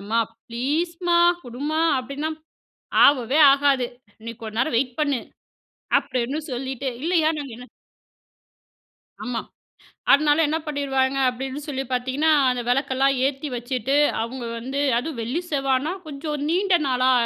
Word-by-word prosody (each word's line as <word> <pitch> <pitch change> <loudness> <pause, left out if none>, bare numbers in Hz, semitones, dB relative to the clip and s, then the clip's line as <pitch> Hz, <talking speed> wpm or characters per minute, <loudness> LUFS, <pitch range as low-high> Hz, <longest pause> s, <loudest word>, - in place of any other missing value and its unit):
"அம்மா 215 +3 -1 0.3
ப்ளீஸ்மா! 335 +8 0 0.3
குடும்மா." 285 +6 -3 0.2
அப்பிடின்னா, 280 +5 -4 0.7
"ஆவவே 270 +1 +4
ஆகாது. 275 -3 +2 0.4
நீ 230 - -4
கொஞ்ச 220 0 -7
நேரம் 240 0 +1
வெயிட் 255 +1 -2
பண்ணு." 285 -5 +1 0.8
அப்பிடின்னு 255 +5 -2
சொல்லிட்டு. 260 +1 -3
இல்லையா, 330 -2 +2
நாங்க 275 -5 -6
என்ன 250 +1 -11 1.6
ஆமா. 245 -2 -3 0.7
அதனால 295 +1 +4
என்ன 315 - 0
பண்ணிருவாங்க. 275 -2 0
அப்பிடின்னு 265 +3 -4
சொல்லி 270 -2 -2
பார்த்தீங்கன்னா, 260 +5 +1 0.2
அந்த 250 -1 -2
விளக்கெல்லாம் 270 +1 +2
ஏத்தி 280 +2 -3
வச்சுட்டு, 250 +2 -1 0.3
அவங்க 240 +2 -5
வந்து 265 +4 -4 0.2
அதுவும் 280 -1 -5
வெள்ளி, 255 +10 -2
செவ்வாய்னால 280 +6 0
கொஞ்சம் 295 0 -4
நீண்ட 370 +2 +3
நாளா 255 0 +2
270 Hz, 120 wpm, -23 LUFS, 250-300 Hz, 1.6 s, ஆவவே